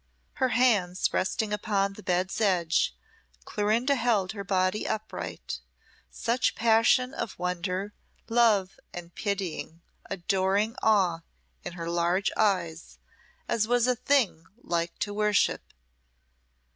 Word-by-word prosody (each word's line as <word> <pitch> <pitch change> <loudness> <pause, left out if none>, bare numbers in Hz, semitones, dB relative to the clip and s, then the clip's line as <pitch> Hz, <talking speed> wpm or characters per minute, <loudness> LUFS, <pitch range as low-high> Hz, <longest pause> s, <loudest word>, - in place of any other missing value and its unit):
Her 260 -3 +1
hands 205 -8 +2
resting 210 +3 0
upon 200 -2 0
the - - -11
bed's 185 +2 -1
edge, 175 -5 +2 0.5
Clorinda 220 +6 +1
held 230 -7 +1
her 200 -2 -6
body 190 +1 0
upright, 215 0 -5 0.5
such 235 +2 0
passion 230 +3 +3
of 230 - -5
wonder, 180 +3 -2 0.3
love, 225 -5 +2 0.2
and 175 -1 -8
pitying 185 -5 -4 0.3
adoring 195 +3 0
awe 190 -6 +3 0.4
in 180 - -6
her 170 -1 -6
large 175 +3 +1
eyes 175 -6 0 0.5
as 220 -2 +1
was 240 0 +3
a 250 0 +2
thing 230 - +1 0.2
like 170 0 -2
to 205 - -3
worship. 210 -1 +1
200 Hz, 115 wpm, -27 LUFS, 180-220 Hz, 0.5 s, passion